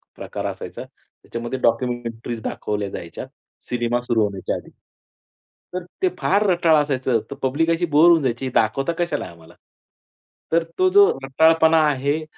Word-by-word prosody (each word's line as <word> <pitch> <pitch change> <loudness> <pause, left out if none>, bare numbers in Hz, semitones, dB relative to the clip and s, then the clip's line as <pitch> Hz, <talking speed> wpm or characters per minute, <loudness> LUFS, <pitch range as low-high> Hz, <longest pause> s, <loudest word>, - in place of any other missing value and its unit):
प्रकार - - -6
असायचा. - - -6
त्याच्यामध्ये 120 +2 -8
डॉक्युमेंटरीज 115 -1 -2
दाखवल्या 105 -2 -3
जायच्या 85 +3 -7 0.4
सिनेमा 120 0 0
सुरू 120 -2 0
होण्याच्या 100 -2 -2
आधी. - - -9 1.0
तर 180 0 -3 0.2
ते 375 - +3
फार 200 +3 +2
रटाळ 170 -3 +4
असायचं. 130 -4 0
तर - - -4
पब्लिक 145 +5 +1
अशी 165 +1 +1
बोर 155 +1 +5
होऊन 170 -2 +5
जायची. 130 +1 -1
"दाखवता 135 +9 +1
कशाला 175 0 -1
आहे - - -10
आम्हाला?" 85 0 -17 1.0
तर 165 +1 +3 0.2
तो 370 - +4
जो 405 +1 +7
रटाळपणा 160 +4 +4
आहे 145 +3 -1
130 Hz, 145 wpm, -22 LUFS, 115-165 Hz, 1.0 s, जो